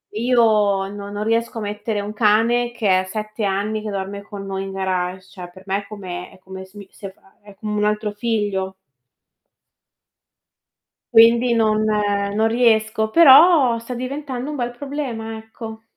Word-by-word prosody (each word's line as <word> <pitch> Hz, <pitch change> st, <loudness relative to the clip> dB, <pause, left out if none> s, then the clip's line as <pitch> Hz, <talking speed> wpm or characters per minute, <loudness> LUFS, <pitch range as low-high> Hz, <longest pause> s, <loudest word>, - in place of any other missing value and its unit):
io 215 Hz, -5 st, +2 dB
no 200 Hz, 0 st, -8 dB
non 205 Hz, +1 st, -4 dB
riesco 230 Hz, +1 st, -1 dB
a -, -, -6 dB
mettere 210 Hz, 0 st, -3 dB
un 205 Hz, -, -6 dB
cane, 230 Hz, +3 st, +2 dB
che 205 Hz, -6 st, +2 dB
è -, -, -7 dB
7 215 Hz, +2 st, -5 dB
anni 205 Hz, +2 st, -1 dB
che 215 Hz, -, -5 dB
dorme 200 Hz, +1 st, -5 dB
con 200 Hz, -1 st, -9 dB
noi, 195 Hz, 0 st, -4 dB
in 195 Hz, -, -6 dB
garage. 185 Hz, -1 st, -3 dB
Cioè 180 Hz, -2 st, -10 dB
per 185 Hz, -, -15 dB
me 195 Hz, +1 st, -1 dB
è 200 Hz, -, -18 dB
come 185 Hz, -4 st, -7 dB
è -, -, -17 dB
come 190 Hz, 0 st, -10 dB
se 190 Hz, +2 st, -18 dB
mi 200 Hz, -1 st, -11 dB
se 195 Hz, -2 st, -9 dB
fa -, -, -31 dB, 0.2 s
uhm, 205 Hz, -, -17 dB
è -, -, -18 dB
come 210 Hz, +1 st, -4 dB
un 210 Hz, -, +1 dB
altro 210 Hz, 0 st, -1 dB
figlio. 205 Hz, -3 st, -2 dB, 2.4 s
Quindi 235 Hz, +1 st, +5 dB
non 215 Hz, -1 st, +2 dB
non 205 Hz, 0 st, 0 dB
riesco. 220 Hz, -2 st, +2 dB
Però 290 Hz, -3 st, +7 dB
sta 230 Hz, +2 st, -7 dB
diventando 260 Hz, +1 st, -5 dB
un 300 Hz, -, -4 dB
bel 245 Hz, -3 st, -3 dB
problema, 240 Hz, -5 st, -5 dB
ecco. 220 Hz, 0 st, -10 dB
215 Hz, 175 wpm, -20 LUFS, 200-230 Hz, 2.4 s, Però